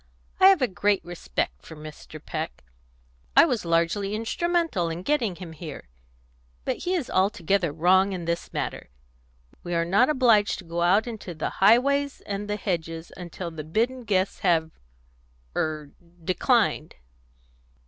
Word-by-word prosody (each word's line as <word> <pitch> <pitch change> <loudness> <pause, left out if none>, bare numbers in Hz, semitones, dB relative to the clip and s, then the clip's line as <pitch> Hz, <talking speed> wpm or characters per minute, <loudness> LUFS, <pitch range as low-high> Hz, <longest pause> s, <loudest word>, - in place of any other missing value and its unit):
I 380 - +8
have 385 -8 +5
a - - +4
great 200 +1 0
respect 175 -1 -3
for 160 - -11
Mr. 155 0 -10
Peck; 155 +1 -5 0.7
I - - +9
was 245 - -1
largely 170 +5 +1
instrumental 320 - 0
in 165 +2 -5
getting 235 -8 0
him 175 -2 -9
here; 150 - -9 0.8
but - - -1
he 365 +1 -1
is 320 -8 -2
altogether 190 -2 +1
wrong 185 +5 +3
in 180 -3 -4
this 170 0 -3
matter. - - -4 0.7
We 175 0 -4
are 170 0 +1
not 200 - +4
obliged 235 -8 +4
to 190 - -10
go 170 +1 -3
out 190 +5 +4
into 215 -7 -7
the 155 - -3
highways 280 +7 +4
and 205 +1 -4
the 210 - 0
hedges 165 -4 -3
until 175 0 -6
the 160 -1 -7
bidden 230 - -1
guests 195 -3 0
have 165 -3 +2 0.8
er 155 -2 -2 0.3
declined." 190 - +1
185 Hz, 150 wpm, -26 LUFS, 165-225 Hz, 0.8 s, I